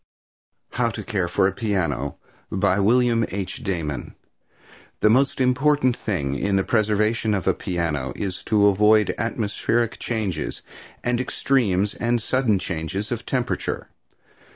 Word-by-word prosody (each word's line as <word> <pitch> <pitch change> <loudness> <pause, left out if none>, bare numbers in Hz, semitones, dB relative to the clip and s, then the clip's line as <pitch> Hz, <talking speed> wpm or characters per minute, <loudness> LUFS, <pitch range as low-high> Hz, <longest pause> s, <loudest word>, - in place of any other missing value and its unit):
HOW 120 -2 +1
TO - - -6
CARE 100 -6 -1
FOR 95 +3 +2
A - - 0
PIANO. 90 - -1 0.4
By 95 - +2
William 115 +2 +3
H. 95 -1 -5
Damon 85 -7 -3 0.9
The 105 - +5
most 135 +4 +3
important 130 0 +3
thing 85 - -2
in 100 +8 0
the 95 - +2
preservation 110 0 +1
of 95 - -3
a - - +3
piano 80 -7 -2
is 95 -3 -3
to 105 -2 +3
avoid 105 +2 +4
atmospheric 115 +1 -1
changes 105 -9 -3 0.4
and 120 0 +1
extremes 105 -8 +1
and 120 0 0
sudden 115 -2 +1
changes 90 +4 -4
of 120 -2 -4
temperature. 125 -2 -2
105 Hz, 130 wpm, -23 LUFS, 95-120 Hz, 0.9 s, The